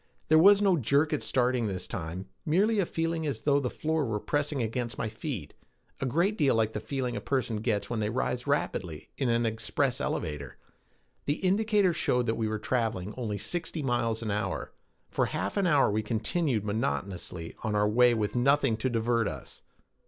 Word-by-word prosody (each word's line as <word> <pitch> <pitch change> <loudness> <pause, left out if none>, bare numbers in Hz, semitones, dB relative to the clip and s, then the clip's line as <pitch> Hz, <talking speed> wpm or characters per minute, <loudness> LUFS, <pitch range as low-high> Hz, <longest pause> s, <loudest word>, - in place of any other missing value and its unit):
There 155 0 +7
was 200 +4 +7
no 190 -3 +4
jerk 145 +4 +2
at 150 - 0
starting 125 -2 +1
this 95 -3 -3
time, 85 +3 -5 0.2
merely 200 +7 +2
a 185 - +1
feeling 165 -1 -1
as 115 -6 -3
though 145 +1 +3
the 130 -3 -1
floor 160 +3 -1
were 110 -5 -1
pressing 145 +3 -1
against 115 +1 -3
my 115 - -2
feet, 110 - -5 0.5
a 135 - -1
great 175 - +1
deal 140 -5 +4
like 110 -1 +1
the - - -2
feeling 125 +1 -3
a - - -3
person 125 -5 -1
gets 105 -1 -1
when 115 - -2
they 105 -1 0
rise 125 +2 -2
rapidly 90 - -2
in 135 -3 +1
an 115 0 +2
express 110 +4 0
elevator. 75 -5 -3 0.7
The 145 - +2
indicator 205 -1 +3
showed 125 -6 +1
that 115 - +1
we 110 - -1
were 110 0 -1
traveling 110 -4 -1
only 110 -5 -3
sixty 165 - -3
miles 115 -3 0
an 110 - -2
hour. 100 -2 -2 0.4
For - - +1
half - - -3
an 200 -3 +2
hour 145 -9 +4
we 110 +1 +1
continued 115 - 0
monotonously 90 -4 -3
on 110 -2 -1
our 105 0 +3
way 120 +2 +5
with 105 -2 -1
nothing 135 -1 +3
to 130 +4 -1
divert 115 -1 +1
us. - - -7
120 Hz, 190 wpm, -29 LUFS, 110-145 Hz, 0.7 s, There